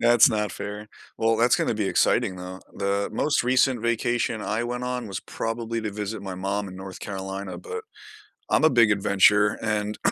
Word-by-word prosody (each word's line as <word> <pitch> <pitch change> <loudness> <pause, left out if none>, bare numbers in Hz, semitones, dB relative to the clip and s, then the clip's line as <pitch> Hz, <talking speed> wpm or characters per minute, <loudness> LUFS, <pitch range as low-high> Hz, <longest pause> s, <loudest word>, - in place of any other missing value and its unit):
That's 120 +1 +6
not 105 -2 -1
fair. 105 +1 -6 0.3
Well, 115 0 +2
that's 120 +2 +4
gonna - - 0
be 105 -2 -1
exciting 110 -6 +2
though. 90 +1 -8
The 100 0 -1
most 150 -4 +1
recent 125 0 +2
vacation 115 -1 0
I 110 +3 -1
went 125 +1 -3
on 125 -2 -3
was 95 - -4
probably 115 0 -4
to 110 -1 -3
visit 105 0 -5
my 95 -2 -6
mom 100 +2 -2
in 95 - -10
North 95 -1 -9
Carolina, 95 0 -5
but 455 -1 -6 0.7
I'm - - +3
a 160 - +6
big 115 -3 +5
adventurer, 105 +1 +4
and 105 -1 -2
105 Hz, 185 wpm, -25 LUFS, 100-120 Hz, 0.7 s, That's